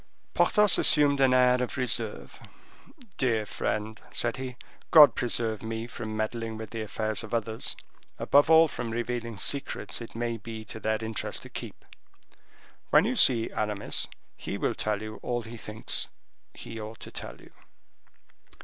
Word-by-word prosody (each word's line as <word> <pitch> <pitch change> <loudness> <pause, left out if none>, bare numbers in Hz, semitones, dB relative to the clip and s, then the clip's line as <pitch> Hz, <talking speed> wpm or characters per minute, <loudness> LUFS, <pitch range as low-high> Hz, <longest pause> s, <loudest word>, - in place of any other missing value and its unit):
Porthos 210 -2 +4
assumed 145 -2 +6
an 130 -1 +5
air 125 0 +4
of 125 - -3
reserve. 120 -4 -1 0.8
"Dear 115 -5 +1
friend," 110 +1 -3
said 120 -1 -1
he, 130 -1 -6 0.3
"God 150 -3 +9
preserve 115 -3 -1
me 110 0 -4
from 110 -2 -6
meddling 110 0 -3
with 110 -1 -8
the 115 -1 -4
affairs 110 +1 -2
of 110 +2 -4
others, 110 0 -2 0.4
above 145 +2 +4
all 160 0 +7
from 120 - -5
revealing 115 -1 -3
secrets 140 +1 -3
it 115 - -9
may 115 0 -2
be 110 0 -8
to 110 - -8
their 110 0 0
interest 110 -1 -3
to - - -11
keep. - - -9 1.0
When 150 +5 +5
you 250 +3 0
see 120 - +5
Aramis, 105 -1 -1 0.3
he - - -5
will - - 0
tell 105 -1 -2
you 110 0 -8
all 120 -1 -2
he 115 +1 -9
thinks 110 -1 -2 0.5
he 115 -1 -8
ought 110 +1 -8
to - - -9
tell - - -7
you." - - -17
115 Hz, 160 wpm, -28 LUFS, 110-125 Hz, 1.0 s, God